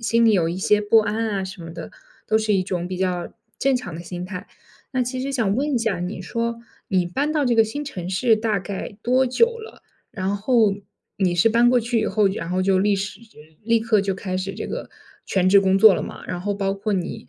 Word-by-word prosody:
心 230 Hz, 0 st, +2 dB
里 225 Hz, -, +5 dB
有 170 Hz, -4 st, +2 dB
一 175 Hz, -, -3 dB
些 210 Hz, +2 st, +2 dB
不 210 Hz, +2 st, +4 dB
安 220 Hz, +1 st, -1 dB
啊 195 Hz, -2 st, -2 dB
什 185 Hz, -2 st, -8 dB
么 165 Hz, -, -8 dB
的， 170 Hz, -, -8 dB, 0.4 s
都 220 Hz, 0 st, +3 dB
是 215 Hz, -1 st, +1 dB
一 185 Hz, -, +2 dB
种 180 Hz, -1 st, -3 dB
比 185 Hz, -, -4 dB
较 180 Hz, -2 st, -2 dB, 0.3 s
正 270 Hz, -1 st, +2 dB
常 195 Hz, -9 st, -6 dB
的 165 Hz, -, -6 dB
心 175 Hz, +1 st, -6 dB
态。 185 Hz, +1 st, -7 dB, 0.5 s
那 255 Hz, -1 st, +1 dB
其 255 Hz, +1 st, -3 dB
实 275 Hz, -, -3 dB
想 225 Hz, -7 st, 0 dB
问 285 Hz, +2 st, 0 dB
一 -, -, +2 dB
下， 220 Hz, -6 st, -1 dB
你 180 Hz, +2 st, -4 dB
说 230 Hz, +4 st, -3 dB, 0.3 s
你 185 Hz, -4 st, +2 dB
搬 275 Hz, +13 st, -1 dB
到 305 Hz, -2 st, +1 dB
这 245 Hz, -2 st, +2 dB
个 225 Hz, -, +6 dB
新 290 Hz, +7 st, -4 dB
城 180 Hz, -11 st, -6 dB
市 220 Hz, +5 st, +3 dB
大 215 Hz, -1 st, 0 dB
概 195 Hz, +2 st, -6 dB
多 255 Hz, +2 st, +3 dB
久 255 Hz, -, +4 dB
了？ 445 Hz, 0 st, -12 dB, 0.3 s
然 195 Hz, -2 st, -2 dB
后 220 Hz, 0 st, +3 dB, 0.4 s
你 185 Hz, -3 st, +1 dB
是 175 Hz, +6 st, +4 dB
搬 235 Hz, +2 st, +4 dB
过 250 Hz, 0 st, +4 dB
去 235 Hz, 0 st, 0 dB
以 215 Hz, -, -1 dB
后， 210 Hz, 0 st, +2 dB
然 190 Hz, -3 st, -4 dB
后 185 Hz, +1 st, 0 dB
就 190 Hz, 0 st, +3 dB
立 200 Hz, +1 st, +2 dB
时 200 Hz, +4 st, -5 dB, 0.4 s
立 230 Hz, 0 st, +3 dB
刻 220 Hz, -2 st, +2 dB
就 195 Hz, -1 st, -1 dB
开 185 Hz, -1 st, -4 dB
始 190 Hz, +1 st, -4 dB
这 -, -, -5 dB
个 -, -, -5 dB, 0.4 s
全 185 Hz, -1 st, +2 dB
职 200 Hz, +1 st, +7 dB
工 190 Hz, -1 st, +2 dB
作 215 Hz, -1 st, +8 dB
了 -, -, -2 dB
嘛， -, -, -8 dB
然 180 Hz, -1 st, -4 dB
后 205 Hz, +2 st, -2 dB
包 195 Hz, -1 st, -1 dB
括 205 Hz, +2 st, -3 dB
你 180 Hz, -8 st, -4 dB
205 Hz, 265 characters per minute, -22 LUFS, 185-230 Hz, 0.5 s, 作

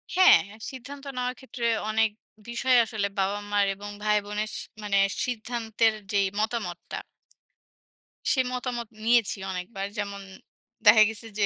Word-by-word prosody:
হ্যাঁ, 370 Hz, 0 st, +8 dB, 0.3 s
সিদ্ধান্ত 275 Hz, +2 st, -9 dB
নেওয়ার 250 Hz, 0 st, -1 dB
ক্ষেত্রে 255 Hz, -3 st, -5 dB, 0.2 s
অনেক 220 Hz, 0 st, +3 dB, 0.4 s
বিষয় 250 Hz, +2 st, +3 dB
আসলে 215 Hz, -3 st, -1 dB
বাবা-মার 205 Hz, +1 st, +1 dB
এবং 205 Hz, +1 st, -8 dB
ভাইবোনের 210 Hz, 0 st, 0 dB
সি -, -, -4 dB, 0.2 s
মানে 200 Hz, -1 st, +1 dB, 0.3 s
সিদ্ধান্তের 225 Hz, -2 st, 0 dB, 0.2 s
যেই 200 Hz, -2 st, +3 dB
মতামতটা 215 Hz, -5 st, -3 dB, 1.3 s
সে 265 Hz, -, +2 dB
মতামত 245 Hz, -2 st, -3 dB, 0.2 s
নিয়েছি 230 Hz, -3 st, +3 dB
অনেকবার। 190 Hz, +2 st, -4 dB
যেমন 200 Hz, -1 st, -3 dB, 0.6 s
দেখা 215 Hz, -1 st, +9 dB
গেছে 225 Hz, +1 st, -6 dB
যে 205 Hz, -, +4 dB
220 Hz, 120 wpm, -27 LUFS, 205-240 Hz, 1.3 s, দেখা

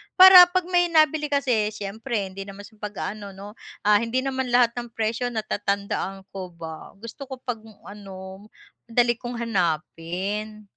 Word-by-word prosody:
para 370 Hz, -1 st, +11 dB
'pag 370 Hz, +1 st, 0 dB
may 355 Hz, -1 st, +4 dB
nabili 310 Hz, -2 st, +3 dB
kasi 260 Hz, -7 st, +1 dB
siyempre 205 Hz, 0 st, -4 dB
hindi 195 Hz, +1 st, -7 dB
naman 200 Hz, 0 st, -10 dB
siya 210 Hz, +1 st, -16 dB
pag-aano 210 Hz, -1 st, -6 dB
'no, 205 Hz, +3 st, -11 dB, 0.3 s
ah, 210 Hz, 0 st, +5 dB
hindi 235 Hz, +3 st, -1 dB
naman 265 Hz, -1 st, -2 dB
lahat 245 Hz, -1 st, +5 dB
ng 240 Hz, -1 st, -6 dB
presyo 225 Hz, +2 st, -1 dB
natatandaan 200 Hz, -2 st, -2 dB
ko 185 Hz, -2 st, -7 dB
ba, 160 Hz, -1 st, -9 dB
gusto 230 Hz, +7 st, -10 dB
ko 260 Hz, -1 st, -8 dB
'pag 245 Hz, -3 st, -3 dB, 0.3 s
ano, 195 Hz, 0 st, -10 dB, 0.4 s
madali 240 Hz, 0 st, +2 dB
kong 240 Hz, 0 st, -6 dB
hanapin. 195 Hz, +2 st, -2 dB
215 Hz, 150 wpm, -24 LUFS, 195-245 Hz, 0.4 s, para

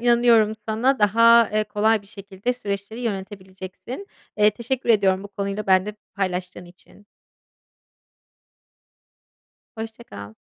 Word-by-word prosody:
inanıyorum 235 Hz, -2 st, +4 dB
sana 245 Hz, +4 st, +1 dB
daha, 230 Hz, +2 st, +5 dB
eee, 215 Hz, 0 st, +1 dB
kolay 210 Hz, 0 st, +1 dB
bir -, -, -20 dB
şekilde 200 Hz, +3 st, -5 dB
süreçleri 205 Hz, -1 st, -5 dB
yönetebileceksin. 195 Hz, -, -7 dB, 0.3 s
Eee, 210 Hz, 0 st, +5 dB
teşekkür 240 Hz, +4 st, -4 dB
ediyorum 195 Hz, -3 st, +3 dB
bu 200 Hz, -, -9 dB
konuyla 200 Hz, +1 st, -4 dB
benimle 190 Hz, +2 st, +2 dB, 0.2 s
paylaştığın 180 Hz, -2 st, -3 dB
için. 180 Hz, +3 st, -19 dB, 2.7 s
Hoşça 225 Hz, +1 st, -8 dB
kal. 100 Hz, +1 st, -10 dB
210 Hz, 110 wpm, -23 LUFS, 195-230 Hz, 2.7 s, daha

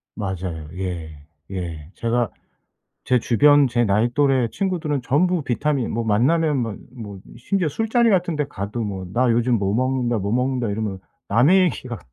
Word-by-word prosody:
맞아요. 95 Hz, -6 st, -4 dB
예. 90 Hz, -4 st, -4 dB, 0.4 s
예. 85 Hz, -5 st, -5 dB
제가 120 Hz, 0 st, 0 dB, 0.7 s
제 125 Hz, -1 st, +2 dB
주변 145 Hz, +5 st, +5 dB
제 120 Hz, -1 st, +1 dB
나이 110 Hz, +2 st, +2 dB
또래 135 Hz, -3 st, +3 dB
친구들은 165 Hz, -, -2 dB
전부 170 Hz, +8 st, +1 dB
비타민 140 Hz, 0 st, -1 dB
뭐 115 Hz, +1 st, -1 dB
만나면 140 Hz, +8 st, +2 dB
막 115 Hz, -5 st, -2 dB, 0.2 s
뭐 105 Hz, -5 st, -8 dB, 0.2 s
심지어 180 Hz, +8 st, -1 dB
술자리 225 Hz, -, +2 dB
같은 180 Hz, -4 st, +1 dB
데 150 Hz, -, 0 dB
가도 105 Hz, -2 st, -5 dB
뭐 100 Hz, -4 st, -4 dB
"나 125 Hz, +2 st, +2 dB
요즘 120 Hz, +1 st, +2 dB
뭐 100 Hz, -1 st, -1 dB
먹는다. 125 Hz, 0 st, 0 dB
뭐 100 Hz, +1 st, -2 dB
먹는다." 125 Hz, -1 st, 0 dB
이러면 100 Hz, -2 st, -3 dB, 0.3 s
남의 135 Hz, -, +5 dB
얘기 175 Hz, -7 st, -1 dB
같 120 Hz, -3 st, -5 dB
120 Hz, 300 characters per minute, -22 LUFS, 105-145 Hz, 0.7 s, 주변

